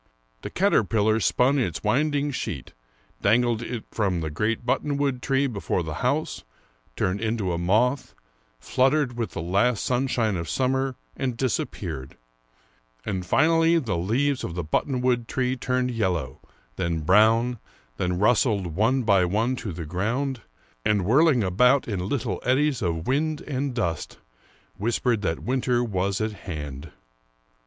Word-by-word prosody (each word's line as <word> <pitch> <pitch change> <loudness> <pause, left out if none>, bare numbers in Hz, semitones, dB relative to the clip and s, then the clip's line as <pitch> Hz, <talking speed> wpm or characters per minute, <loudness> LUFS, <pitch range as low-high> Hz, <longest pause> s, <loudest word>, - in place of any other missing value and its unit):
The - - -5
caterpillar 110 - +2
spun 130 +5 +2
its 95 -10 -2
winding 145 +6 +1
sheet, 90 - -5 0.5
dangled 115 +2 +2
in 120 - -4
it 115 - -6
from 95 -6 0
the 80 -1 -3
great 110 +8 -1
buttonwood 140 0 0
tree 135 +1 +1
before 100 -7 -2
the 80 -1 -5
house, - - -1 0.5
turned 95 +3 -1
into 110 -5 -1
a 85 - -2
moth, 110 +10 +1 0.4
fluttered 130 - +1
with 115 -2 -3
the - - -4
last 100 +6 +1
sun 125 +2 +1
shine 110 -6 0
of 85 -2 -5
summer, 130 - 0 0.2
and 125 -3 -2
disappeared; 90 - -3 0.9
and 95 -2 -3
finally 165 +3 +4
the 115 - -1
leaves 125 +11 0
of 85 - -4
the 90 - -2
buttonwood 125 - 0
tree 130 0 0
turned 125 0 -1
yellow, 90 - -1 0.4
then 85 -3 -1
brown, 110 +7 +4 0.4
then 90 0 -1
rustled 105 - +2
one 120 +6 +2
by 100 -4 +4
one 110 +8 +1
to 110 -5 -5
the 85 -1 -6
ground, 115 - -2 0.4
and 105 -4 +1
whirling 135 - +4
about 125 +9 +3
in 95 -3 -3
little 115 -9 -2
eddies 135 +2 +2
of 85 -3 -2
wind 150 +3 0
and 135 -2 -3
dust, 85 -9 -2 0.6
whispered 115 +1 0
that 85 -4 -2
winter 125 -1 +1
was 100 -3 -1
at 110 0 -1
hand. 75 -6 -7
115 Hz, 145 wpm, -25 LUFS, 95-130 Hz, 0.9 s, finally